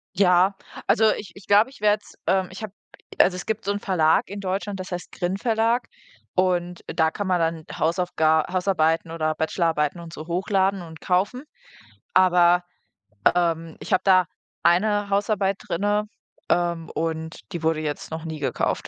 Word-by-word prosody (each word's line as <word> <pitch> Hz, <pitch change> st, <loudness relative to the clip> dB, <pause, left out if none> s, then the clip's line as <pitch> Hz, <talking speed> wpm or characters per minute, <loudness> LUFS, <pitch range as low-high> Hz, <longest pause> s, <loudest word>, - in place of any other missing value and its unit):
Ja, 185 Hz, 0 st, +4 dB, 0.3 s
also 220 Hz, 0 st, +4 dB
ich 205 Hz, -, -8 dB
ich 195 Hz, -, -14 dB
glaube, 210 Hz, +5 st, +5 dB
werde 210 Hz, 0 st, +3 dB
es -, -, -16 dB
ähm, 190 Hz, -1 st, +2 dB
ich 185 Hz, -, -9 dB
habe 210 Hz, -3 st, -6 dB, 0.5 s
also 180 Hz, -, +5 dB
es 180 Hz, -, -6 dB
gibt 220 Hz, 0 st, -2 dB
so 200 Hz, -, +1 dB
'n 205 Hz, -, -2 dB
Verlag 165 Hz, -6 st, +2 dB
in 200 Hz, +1 st, -6 dB
Deutschland, 195 Hz, +1 st, -3 dB
das 185 Hz, 0 st, -7 dB
heißt 180 Hz, 0 st, -5 dB
GRIN 180 Hz, +1 st, -2 dB
Verlag 230 Hz, +2 st, +1 dB, 0.5 s
und 180 Hz, -1 st, 0 dB
da 160 Hz, 0 st, +1 dB
kann 205 Hz, +2 st, -4 dB
man 180 Hz, -1 st, +2 dB
dann 165 Hz, -1 st, -1 dB
Hausaufga 160 Hz, -2 st, +2 dB
Hausarbeiten 165 Hz, -3 st, +1 dB
oder 155 Hz, -1 st, -1 dB
Bachelorarbeiten 160 Hz, -1 st, 0 dB
und 165 Hz, -1 st, -10 dB
so 155 Hz, 0 st, -8 dB
hochladen 190 Hz, +2 st, +1 dB
und 160 Hz, -2 st, -10 dB
kaufen. 195 Hz, +8 st, 0 dB, 0.7 s
Aber, 180 Hz, -1 st, +5 dB, 0.7 s
ähm, 165 Hz, -2 st, 0 dB
ich -, -, -4 dB
habe 185 Hz, -, +4 dB
da 185 Hz, -2 st, +5 dB, 0.4 s
eine 205 Hz, +4 st, +3 dB
Hausarbeit 200 Hz, -1 st, +1 dB
drinne, 205 Hz, +4 st, 0 dB, 0.4 s
ähm, 170 Hz, -2 st, 0 dB
und 160 Hz, 0 st, -3 dB
die 170 Hz, -4 st, -4 dB
wurde 160 Hz, -1 st, +1 dB
jetzt 150 Hz, -1 st, -4 dB
noch 160 Hz, +1 st, -5 dB
nie 160 Hz, -1 st, -5 dB
gekauft. 140 Hz, -, -1 dB
180 Hz, 165 wpm, -24 LUFS, 165-200 Hz, 0.7 s, glaube